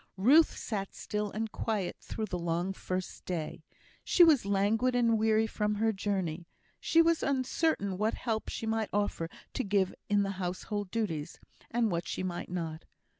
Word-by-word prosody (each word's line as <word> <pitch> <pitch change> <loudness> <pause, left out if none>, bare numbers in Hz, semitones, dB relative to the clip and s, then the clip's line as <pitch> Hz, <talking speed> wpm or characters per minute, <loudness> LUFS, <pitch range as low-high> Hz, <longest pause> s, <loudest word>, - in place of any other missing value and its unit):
Ruth 275 +12 +5
sat 195 -4 -4
still 210 0 -3
and 220 +1 -3
quiet 210 -5 -2
through 220 - -4
the 180 -3 -4
long 175 +2 -1
first 185 -1 -4
day. 165 -2 -4 0.4
She 355 - +6
was 295 - +5
languid 215 +6 +2
and 235 -2 +4
weary 220 0 +3
from 210 -1 -1
her 220 +1 +1
journey; 185 -5 -2 0.3
she 330 0 +4
was 335 -1 +2
uncertain 260 - 0
what 215 +1 +1
help 225 -3 -2
she - - -4
might 220 -1 0
offer 205 -5 -1 0.2
to - - -1
give 195 -2 +1 0.2
in 205 0 +4
the 195 - -1
household 185 +3 -3
duties, 180 -9 -3 0.3
and 230 -2 +1
what 170 0 -2
she - - -3
might 175 -2 -4
not. 165 -3 -4
205 Hz, 170 wpm, -31 LUFS, 185-225 Hz, 0.4 s, She